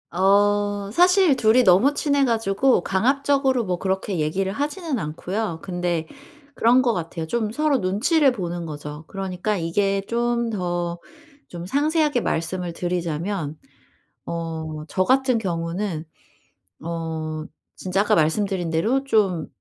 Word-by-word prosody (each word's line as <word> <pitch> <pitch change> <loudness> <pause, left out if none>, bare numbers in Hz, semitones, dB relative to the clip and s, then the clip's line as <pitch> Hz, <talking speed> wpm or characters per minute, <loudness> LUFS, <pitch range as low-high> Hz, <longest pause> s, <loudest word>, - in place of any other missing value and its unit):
어 205 +1 +2
사실 360 -1 +5
둘이 245 0 +4
너무 220 +9 +5
친해 285 -2 +2
가지고 225 -2 +2
강압적으로 265 +4 +2
뭐 180 -2 -2
그렇게 190 -1 -2
얘기를 185 +6 -1
하지는 290 - -2
않고요. 170 +4 -3
근데 175 -3 -2 0.5
그런 245 +2 +4
것 240 -2 +2
같아요. 165 -3 -4
좀 215 +5 -1
서로 295 +2 +1
눈치를 260 - +2
보는 175 -6 -4
거죠. 150 0 -8
그러니까 195 +1 -3
이게 195 +4 0
좀 235 0 0
더 175 -4 -2 0.5
좀 175 0 -7
상세하게 295 - +1
말씀을 175 0 -2
드리자면 170 -2 -3 0.7
어 160 -2 -5
저 185 - +1
같은 260 +2 +3
경우는 170 -2 -3 0.8
어 160 -2 -4 0.4
진짜 190 +1 +1
아까 205 - +2
말씀드린 180 +2 +1
대로 220 +12 +1
좀 200 - +1
195 Hz, 265 characters per minute, -23 LUFS, 170-240 Hz, 0.8 s, 사실